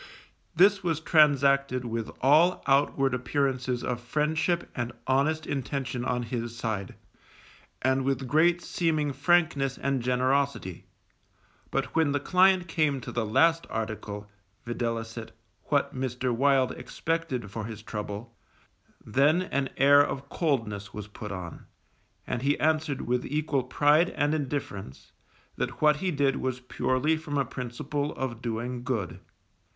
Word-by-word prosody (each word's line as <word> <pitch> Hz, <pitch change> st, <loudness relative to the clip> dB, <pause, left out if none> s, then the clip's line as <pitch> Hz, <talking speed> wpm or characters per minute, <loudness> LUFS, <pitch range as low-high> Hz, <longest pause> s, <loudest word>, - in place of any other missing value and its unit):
This 195 Hz, +2 st, +5 dB
was 165 Hz, -3 st, 0 dB
transacted 140 Hz, -5 st, +3 dB
with 115 Hz, -1 st, -3 dB
all 155 Hz, +7 st, +4 dB
outward 135 Hz, -1 st, +2 dB
appearances 130 Hz, -1 st, -1 dB
of 125 Hz, -1 st, -2 dB
friendship 155 Hz, +6 st, 0 dB
and 120 Hz, 0 st, -3 dB
honest 150 Hz, +4 st, +1 dB
intention 135 Hz, -2 st, -3 dB
on 125 Hz, -1 st, -1 dB
his 120 Hz, 0 st, -4 dB
side, 110 Hz, -5 st, -3 dB, 0.9 s
and 130 Hz, +1 st, +2 dB
with 135 Hz, -1 st, -1 dB
great 170 Hz, +5 st, +3 dB
seeming 155 Hz, -4 st, 0 dB
frankness 145 Hz, -2 st, +2 dB
and 135 Hz, -2 st, -1 dB
generosity; 130 Hz, -5 st, 0 dB, 0.8 s
but 135 Hz, 0 st, -2 dB
when 160 Hz, -3 st, +3 dB
the 145 Hz, -, +1 dB
client 185 Hz, +3 st, +4 dB
came 155 Hz, -5 st, +1 dB
to -, -, -7 dB
the 115 Hz, -3 st, -2 dB
last 165 Hz, +9 st, +3 dB
article, 105 Hz, -2 st, -4 dB, 0.4 s
viz., 115 Hz, -1 st, -3 dB, 0.5 s
what -, -, +1 dB
Mr. 130 Hz, -1 st, -2 dB
Wild 135 Hz, 0 st, +3 dB
expected 155 Hz, -10 st, -3 dB
for 110 Hz, 0 st, -4 dB
his 110 Hz, -1 st, -8 dB
trouble, 105 Hz, +2 st, -6 dB, 0.7 s
then 145 Hz, -, +3 dB
an 140 Hz, -7 st, -1 dB
air 145 Hz, +1 st, +7 dB
of 140 Hz, 0 st, -5 dB
coldness 105 Hz, -, -2 dB
was 105 Hz, -1 st, -6 dB
put 105 Hz, 0 st, -8 dB
on, 90 Hz, -4 st, -7 dB, 0.6 s
and 120 Hz, -, -3 dB
he 140 Hz, +2 st, +1 dB
answered 155 Hz, -2 st, +1 dB
with 125 Hz, 0 st, -1 dB
equal 150 Hz, -1 st, 0 dB
pride 145 Hz, +6 st, +3 dB
and 145 Hz, +1 st, 0 dB
indifference, 135 Hz, -, -4 dB, 0.5 s
that -, -, -3 dB
what 150 Hz, -1 st, +4 dB
he 185 Hz, +4 st, -1 dB
did 140 Hz, -4 st, +1 dB
was 130 Hz, -1 st, -2 dB
purely 130 Hz, +4 st, 0 dB
from 155 Hz, -2 st, -4 dB
a 140 Hz, -, +2 dB
principle 130 Hz, +4 st, -4 dB
of 120 Hz, -3 st, -4 dB
doing 120 Hz, +1 st, -3 dB
good. 115 Hz, -9 st, -3 dB
135 Hz, 135 wpm, -27 LUFS, 120-150 Hz, 0.9 s, air